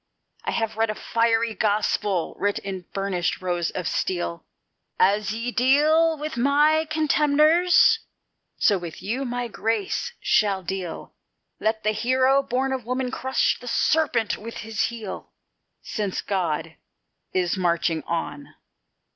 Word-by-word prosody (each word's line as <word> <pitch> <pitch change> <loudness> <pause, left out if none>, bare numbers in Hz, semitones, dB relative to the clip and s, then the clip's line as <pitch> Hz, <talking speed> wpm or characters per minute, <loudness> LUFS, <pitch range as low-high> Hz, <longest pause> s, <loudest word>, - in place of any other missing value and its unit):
I - - -1
have 225 -1 -2
read 225 0 +1
a 215 - -2
fiery 230 0 +1
gospel, 205 -4 0
writ 205 0 0
in 190 -3 -6
burnished 195 -3 -1
rows 175 -2 -1
of 180 - -4
steel: 175 -2 -2 0.6
"As 205 +2 +3
ye 230 +3 -3
deal 305 +6 +3
with 300 -3 -5
my 295 +5 +3
contemners, 310 +6 +4 0.6
so 200 -2 +3
with 170 0 -8
you 245 +8 -2
my 245 0 -3
grace 225 -2 -2
shall 200 -3 +2
deal; 180 -2 -5 0.5
Let 220 0 -1
the 215 - +2
Hero, 260 +4 +3
born 265 +1 -1
of 260 -2 -3
woman, 250 +2 -2
crush 260 0 0
the 245 - -11
serpent 245 -3 +1
with 230 +2 -8
his 220 -2 0
heel, 225 -4 -6 0.5
Since 205 -4 -3
God 165 -5 -2 0.5
is 180 -1 0
marching 170 -3 0
on." 155 -3 -4
225 Hz, 130 wpm, -24 LUFS, 190-260 Hz, 0.6 s, contemners